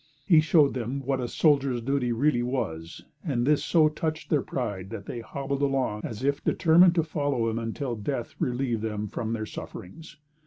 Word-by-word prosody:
He 165 Hz, -5 st, +6 dB
showed 155 Hz, -2 st, +4 dB
them 125 Hz, +2 st, -3 dB
what 135 Hz, 0 st, 0 dB
a 125 Hz, -, -2 dB
soldier's 140 Hz, -2 st, +2 dB
duty 125 Hz, 0 st, 0 dB
really 120 Hz, +2 st, +2 dB
was, 85 Hz, -11 st, -4 dB, 0.2 s
and 125 Hz, -8 st, 0 dB
this 150 Hz, +1 st, +3 dB
so 160 Hz, -3 st, +4 dB
touched 155 Hz, +1 st, -3 dB
their 150 Hz, -3 st, +3 dB
pride 100 Hz, -9 st, -4 dB
that 100 Hz, -, -7 dB
they 120 Hz, -, -5 dB
hobbled 140 Hz, +4 st, -4 dB
along 135 Hz, -6 st, 0 dB
as 115 Hz, +2 st, -6 dB
if 140 Hz, +1 st, 0 dB
determined 175 Hz, +1 st, +5 dB
to 165 Hz, -, +3 dB
follow 145 Hz, -6 st, -1 dB
him 115 Hz, -, -2 dB
until 120 Hz, +2 st, -3 dB
death 115 Hz, +3 st, -4 dB
relieved 120 Hz, -3 st, -1 dB
them 105 Hz, -1 st, -3 dB
from 110 Hz, +2 st, -4 dB
their 110 Hz, -1 st, -3 dB
sufferings. 155 Hz, -, -9 dB
135 Hz, 185 wpm, -27 LUFS, 115-150 Hz, 0.2 s, He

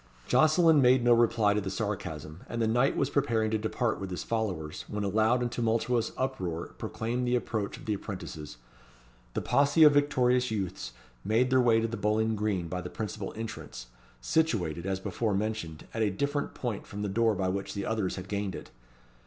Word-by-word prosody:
Jocelyn 155 Hz, -1 st, +5 dB
made 125 Hz, -1 st, +5 dB
no 120 Hz, 0 st, +6 dB
reply 115 Hz, -3 st, +3 dB
to 105 Hz, -, 0 dB
the 95 Hz, -, -4 dB
sarcasm, 90 Hz, -6 st, -4 dB
and 115 Hz, -, -3 dB
the 115 Hz, -, +2 dB
knight 120 Hz, +5 st, +2 dB
was 140 Hz, 0 st, 0 dB
preparing 115 Hz, -6 st, +1 dB
to 110 Hz, -, +1 dB
depart 110 Hz, +1 st, -1 dB
with 95 Hz, -1 st, -5 dB
his 90 Hz, -, -4 dB
followers, 95 Hz, -9 st, -3 dB
when 105 Hz, 0 st, -3 dB
a -, -, 0 dB
loud 110 Hz, +5 st, +2 dB
and 120 Hz, -, -2 dB
tumultuous 115 Hz, 0 st, 0 dB
uproar 95 Hz, -11 st, -3 dB
proclaimed 120 Hz, +3 st, -2 dB
the 125 Hz, -, +2 dB
approach 110 Hz, -4 st, -2 dB
of -, -, -13 dB
the 110 Hz, -, 0 dB
apprentices. 85 Hz, -, -7 dB, 0.8 s
The -, -, -1 dB
posse 145 Hz, +3 st, +4 dB
of 150 Hz, -1 st, +8 dB
victorious 125 Hz, -3 st, +3 dB
youths 95 Hz, -, -4 dB, 0.3 s
made 115 Hz, +5 st, +2 dB
their 130 Hz, -1 st, +5 dB
way 115 Hz, -2 st, +4 dB
to 115 Hz, -, 0 dB
the 115 Hz, 0 st, -5 dB
bowling 110 Hz, +2 st, +1 dB
green 100 Hz, -5 st, -1 dB
by 90 Hz, +2 st, -3 dB
the 90 Hz, -, -6 dB
principal 105 Hz, -1 st, -5 dB
entrance, 110 Hz, -, -7 dB, 0.3 s
situated, 90 Hz, -, 0 dB
as 95 Hz, -1 st, -1 dB
before 100 Hz, +2 st, -1 dB
mentioned, 100 Hz, -7 st, -3 dB
at 115 Hz, -, -2 dB
a 110 Hz, -, +3 dB
different 140 Hz, +9 st, -2 dB
point 120 Hz, -5 st, -4 dB
from 105 Hz, +1 st, -5 dB
the -, -, -1 dB
door 110 Hz, +2 st, +2 dB
by 95 Hz, -1 st, 0 dB
which 100 Hz, +2 st, -3 dB
the 100 Hz, -, -3 dB
others 110 Hz, -5 st, -1 dB
had 95 Hz, 0 st, -7 dB
gained 100 Hz, -3 st, -2 dB
it. -, -, -9 dB
110 Hz, 195 wpm, -29 LUFS, 95-120 Hz, 0.8 s, of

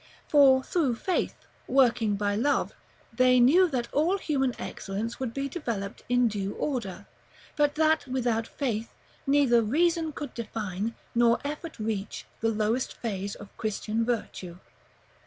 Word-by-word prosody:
For 270 Hz, -3 st, +6 dB
through 285 Hz, -8 st, 0 dB
faith, 365 Hz, +10 st, -1 dB, 0.3 s
working 235 Hz, -5 st, +3 dB
by 205 Hz, 0 st, 0 dB
love, 280 Hz, +7 st, +1 dB, 0.4 s
they 255 Hz, -1 st, +4 dB
knew 335 Hz, +10 st, +6 dB
that 245 Hz, -5 st, -2 dB
all 330 Hz, +7 st, +2 dB
human 270 Hz, -8 st, -1 dB
excellence 210 Hz, +4 st, -5 dB
would 260 Hz, -3 st, -2 dB
be 275 Hz, +3 st, -3 dB
developed 235 Hz, -, -4 dB
in 245 Hz, -1 st, +4 dB
due 200 Hz, -2 st, -3 dB
order; 215 Hz, -8 st, -3 dB, 0.5 s
but 290 Hz, -1 st, +2 dB
that, 315 Hz, -1 st, +2 dB
without 240 Hz, -3 st, 0 dB
faith, 230 Hz, -5 st, -3 dB, 0.4 s
neither 275 Hz, -4 st, +4 dB
reason 325 Hz, +7 st, +1 dB
could 290 Hz, -3 st, -7 dB
define, 215 Hz, -2 st, -4 dB, 0.2 s
nor 235 Hz, 0 st, +4 dB
effort 300 Hz, +3 st, -5 dB
reach, 215 Hz, -2 st, -4 dB
the 225 Hz, -, +1 dB
lowest 220 Hz, +3 st, -1 dB
phase 200 Hz, -3 st, -4 dB
of 205 Hz, -1 st, -13 dB
Christian 220 Hz, +1 st, -2 dB
virtue. 210 Hz, -7 st, -3 dB
240 Hz, 140 wpm, -27 LUFS, 215-285 Hz, 0.5 s, For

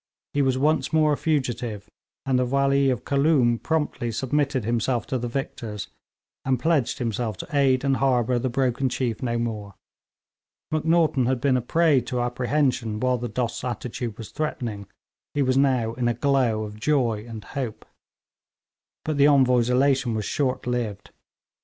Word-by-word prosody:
He 145 Hz, -, +2 dB
was 130 Hz, -1 st, +2 dB
once 150 Hz, +4 st, +1 dB
more 155 Hz, -2 st, +3 dB
a -, -, +2 dB
fugitive, 120 Hz, -9 st, -2 dB, 0.4 s
and 130 Hz, -2 st, +2 dB
the 125 Hz, -, +2 dB
Wali 140 Hz, +1 st, +2 dB
of 125 Hz, -5 st, -2 dB
Khooloom 140 Hz, -5 st, +3 dB
promptly 150 Hz, -7 st, -1 dB
submitted 135 Hz, +1 st, 0 dB
himself 120 Hz, +1 st, 0 dB
to 130 Hz, -, -2 dB
the 120 Hz, -, -3 dB
victors, 115 Hz, -4 st, -5 dB, 0.5 s
and 130 Hz, -2 st, +1 dB
pledged 150 Hz, -2 st, +1 dB
himself 115 Hz, -3 st, -2 dB
to -, -, -7 dB
aid 135 Hz, -2 st, +3 dB
and 135 Hz, -1 st, +2 dB
harbour 125 Hz, -2 st, +2 dB
the 130 Hz, +2 st, -1 dB
broken 130 Hz, +1 st, 0 dB
chief 120 Hz, -3 st, -2 dB
no 120 Hz, -2 st, -1 dB
more. 105 Hz, -4 st, -4 dB, 1.0 s
Macnaghten 155 Hz, -4 st, +2 dB
had 130 Hz, -1 st, +1 dB
been 130 Hz, +1 st, +2 dB
a 125 Hz, -, +1 dB
prey 155 Hz, +2 st, +3 dB
to 125 Hz, +1 st, -3 dB
apprehension 125 Hz, -2 st, 0 dB
while 125 Hz, +1 st, +1 dB
the 120 Hz, 0 st, -4 dB
Dost's 115 Hz, +1 st, -3 dB
attitude 120 Hz, -2 st, -4 dB
was 115 Hz, -, -9 dB
threatening; 115 Hz, -10 st, -4 dB, 0.5 s
he 145 Hz, -, +2 dB
was 130 Hz, 0 st, +1 dB
now 130 Hz, -5 st, +2 dB
in 120 Hz, 0 st, -1 dB
a 120 Hz, -, +1 dB
glow 125 Hz, -4 st, +1 dB
of 105 Hz, 0 st, -8 dB
joy 120 Hz, -5 st, +1 dB
and 110 Hz, -2 st, -7 dB
hope. 125 Hz, 0 st, -5 dB, 1.2 s
But 155 Hz, -2 st, -1 dB
the 140 Hz, +1 st, +6 dB
Envoy's 125 Hz, -4 st, +4 dB
elation 130 Hz, -2 st, +2 dB
was 105 Hz, -2 st, -2 dB
short 130 Hz, -3 st, -1 dB
lived. 120 Hz, -5 st, -3 dB
125 Hz, 165 wpm, -24 LUFS, 115-140 Hz, 1.2 s, the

